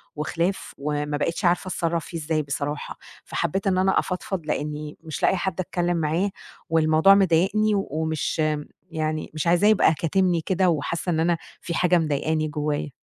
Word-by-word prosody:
وخلاف 170 +5 -2
وما 145 +1 -2
بقيتش 165 +6 -1
عارفة 175 +1 +2
أتصرّف 170 -3 -1
فيه 170 - -6
إزاي 155 0 -1
بصراحة، 145 +1 -4 0.3
فحبّيت 195 +5 -2
إن 185 -1 +2
أنا 190 +1 +3
أفضفض 180 -2 -3
لإنّي 150 0 -3
مش 160 -2 -6
لاقية - - +4
حد 190 +1 -2
أتكلم 175 -1 -1
معاه 165 +5 +1 0.4
والموضوع 160 +4 +5
مضايقني 195 +3 +3
ومش 160 -5 -2
م 155 -1 +1 0.3
يعني 155 -1 -2
مش 155 +2 -2
عايزاه 175 +4 +4
يبقى 205 -6 +5
كاتمني 175 +2 +1
كده 185 +2 +1
وحاسّة 170 +2 -1
إن 160 -2 +1
أنا 170 +1 +2 0.2
في 170 - -4
حاجة 180 +1 +3
مضايقاني 155 0 0
جوّايا. 150 -1 -2
165 Hz, 160 wpm, -24 LUFS, 155-180 Hz, 0.4 s, والموضوع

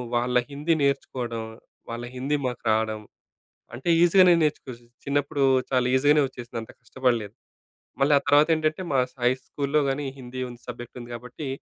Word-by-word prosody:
వాళ్ళ 125 +1 0 0.2
హిందీ 150 +4 0
నేర్చుకోడం, 125 -4 -1 0.5
వాళ్ళ 120 +1 -5
హిందీ 135 +4 -1
మాకు 125 -1 -5
రాడం. 110 0 0 0.8
అంటే, 130 +8 -4
ఈజీ 175 +1 +4
గానే 180 -1 +7
నేర్చుకోవచ్చు. 125 -5 -3 0.2
చిన్నప్పుడు 145 0 0 0.3
చాలా 125 -1 +2
ఈజీ 130 +2 +2
గానే 150 -1 +5
వచ్చేసింది. 120 -2 -7
అంత 110 - -11
కష్టపడలేదు. 120 -5 -1 0.7
మళ్ళీ 145 +2 +4
ఆ 140 - +6
తర్వాత 145 +1 +5
ఏంటంటే, 155 +3 -1
మా 135 - +4
స - - -29
హై 125 - +5 0.2
స్కూల్‌లో 145 +1 0
కానీ, 140 +2 -2
హిందీ 130 0 -8
ఉంది 120 0 -12
సబ్జెక్ట్ 120 -1 -8
ఉంది 120 0 -10
గాబట్టి, 125 +5 -8
130 Hz, 165 wpm, -25 LUFS, 120-145 Hz, 0.8 s, గానే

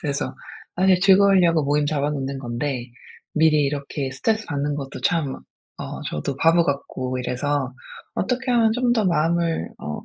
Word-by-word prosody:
그래서 140 -2 -2 0.4
사실 185 0 +4
즐거우려고 190 -4 +5
모임 145 +1 +1
잡아 145 -1 0
놓는 135 -1 -3
건데 120 0 -3 0.5
미리 155 -1 +4
이렇게 140 -1 -3
스트레스 215 +12 -1
받는 145 -1 -2
것도 135 -2 -6
참 155 -6 0 0.5
어 - - -6
저도 125 - -3
바보 165 +3 +4
같고 130 -3 -3
이래서 130 +1 -1 0.4
'어떻게 255 +4 -1
하면 230 -2 +4
좀 245 +1 +1
더 220 -5 +1
마음을 165 - +1
어 75 0 -6
150 Hz, 315 characters per minute, -23 LUFS, 140-180 Hz, 0.5 s, 즐거우려고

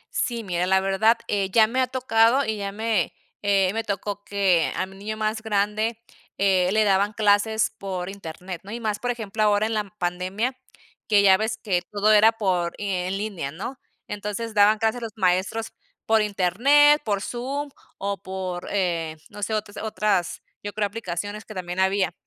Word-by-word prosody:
Sí, 235 -2 -1
mira, 180 -1 -1
la 190 0 +4
verdad, 195 +4 +3
eh, 195 -2 0
ya 220 +3 +5
me 255 +4 0
ha 255 - +2
tocado, 255 +1 +3
y 220 -1 -2
ya 200 -1 -3
me, 215 -4 -1 0.3
eh, 195 -1 +2
me 225 0 -1
tocó 205 0 -4
que, 190 -5 +2
a 185 - -1
mi 190 +1 -14
niño 215 +2 -5
más 215 0 -1
grande, 215 +1 0 0.4
eh, 190 -2 +3
le 215 0 +3
daban 200 +1 +2
clases 215 +1 +2
por 185 -2 -4
internet, 180 -2 -8
¿no? 195 - -12
Y 235 - -4
más, 215 -2 -2
por 245 - -3
ejemplo, 220 -3 -3
ahora 210 0 +3
en 225 - -2
la 210 -1 0
pandemia, 185 +8 -2 0.5
que 205 -2 +4
ya 190 -1 +7
ves 220 +1 -2
que 185 -5 0
todo 210 +1 +3
era 215 +2 +7
por 180 -5 0
en 190 -1 -2
línea, 200 -9 -4
¿no? 210 - -7 0.3
Entonces, 210 +2 -4
daban 210 +1 +5
clases 220 +2 0
a - - -7
los 220 - -8
maestros 190 +3 0 0.3
por 220 -1 +4
internet, 245 - +4
por 205 -5 0
Zoom, 275 +4 -4 0.3
o 200 0 -3
por, 185 -2 -5
eh, 170 -5 -1
no 205 -1 -10
sé, 220 +1 -1
o 215 - +1 0.2
otras 210 -5 -1 0.2
yo 205 -1 -6
creo 210 0 0
aplicaciones 205 0 -5
que 215 - -11
también 180 0 -4
había. 190 -1 +2
205 Hz, 185 wpm, -24 LUFS, 190-220 Hz, 0.5 s, ya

